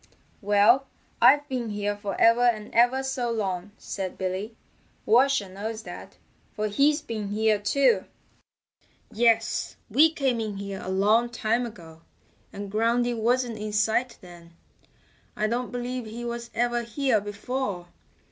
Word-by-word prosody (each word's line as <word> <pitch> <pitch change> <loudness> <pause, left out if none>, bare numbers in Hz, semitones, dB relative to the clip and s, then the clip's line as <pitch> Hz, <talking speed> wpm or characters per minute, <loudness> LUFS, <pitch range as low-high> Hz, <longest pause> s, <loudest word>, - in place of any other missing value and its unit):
"Well, 210 +6 +4 0.3
I've 290 0 +6
been 250 -4 -3
here 205 0 -2
for 205 -1 -5
ever 230 +1 +5
and 230 -4 +1
ever 245 +3 +3
so 265 -2 -2
long," 195 -4 -2
said 190 -2 -5
Billy. 190 +4 -4 0.5
"Washer 245 -1 +3
knows 215 +4 -6
that, - - -10 0.4
for 215 0 -1
he's 290 +7 +2
been 220 -7 -4
here 215 +1 +1
too." 235 -1 +2 1.1
"Yes, 225 0 +1 0.2
we 305 +8 +6
came 265 -6 0
in 215 -3 -4
here 200 -1 -6
a - - -5
long 210 +5 +3
time 235 +1 -1
ago, 165 -7 -13 0.5
and 200 0 -7
Groundy 235 +3 +1
wasn't 235 0 0
in 210 0 -5
sight 225 +4 +1
then. 170 -2 -14 0.8
I 215 - 0
don't 240 +3 -2
believe 245 -1 -4
he 235 +2 -7
was 235 0 -5
ever 240 0 +1
here 235 -1 0
before. 205 -2 -4
225 Hz, 140 wpm, -26 LUFS, 205-245 Hz, 1.1 s, I've